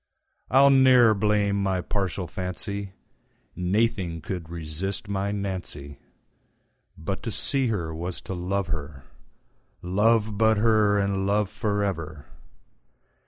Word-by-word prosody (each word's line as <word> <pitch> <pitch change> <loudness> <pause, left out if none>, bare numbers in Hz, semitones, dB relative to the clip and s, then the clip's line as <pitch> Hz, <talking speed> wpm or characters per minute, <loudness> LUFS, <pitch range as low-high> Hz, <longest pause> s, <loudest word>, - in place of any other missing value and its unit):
I'll 140 +1 +6
ne'er 130 -4 +6
blame 100 -1 +1
my 95 -2 0
partial 95 0 -2
fancy, 95 +2 -5 0.6
Naething 95 -2 0
could 85 -1 -5
resist 85 +5 -4
my 100 0 -1
Nancy:But 95 -1 -8
to 115 - -4
see 135 +4 +1
her 85 -8 -2
was 85 +2 -4
to - - -6
love 95 +2 -1
her; 75 -5 -5 0.8
Love 105 +3 +2
but 110 -1 +4
her, 105 -2 +3
and 100 -1 0
love 105 0 +1
for 105 -1 -1
ever. 80 -7 -4
100 Hz, 115 wpm, -25 LUFS, 90-105 Hz, 0.8 s, I'll